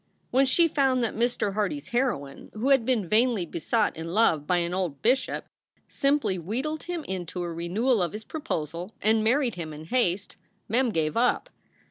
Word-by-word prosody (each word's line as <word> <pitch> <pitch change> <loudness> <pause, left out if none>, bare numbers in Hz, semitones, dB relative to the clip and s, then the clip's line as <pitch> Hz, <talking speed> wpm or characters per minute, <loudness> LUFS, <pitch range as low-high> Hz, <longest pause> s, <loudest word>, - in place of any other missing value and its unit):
When 265 +2 +4
she 335 +6 +5
found 265 -5 +2
that 230 - -1
Mr. 235 -3 0
Hardy 200 -7 0
s 145 - -11
heroine, 240 - -2
who 235 +6 0
had 270 -4 +4
been 235 -7 +1
vainly 220 -2 +2
besought 205 +7 0
in 165 0 -6
love 165 -6 +2
by 180 - +3
an 170 0 -1
old 180 -7 -3
bishop, 255 +3 +1 0.4
simply 275 -9 +1
wheedled 260 - -3
him 345 -2 -4
into 180 - -4
a 170 -1 -4
renewal 200 +8 +1
of 175 -3 -1
his 215 +1 -6
proposal 175 - -4
and 220 +1 +2
married 245 +1 +2
him 160 -3 -6
in 155 +1 -9
haste, 190 -2 0 0.3
Mem 245 +3 +2
gave 155 -7 0
up. 250 - +1
215 Hz, 180 wpm, -26 LUFS, 170-255 Hz, 0.4 s, she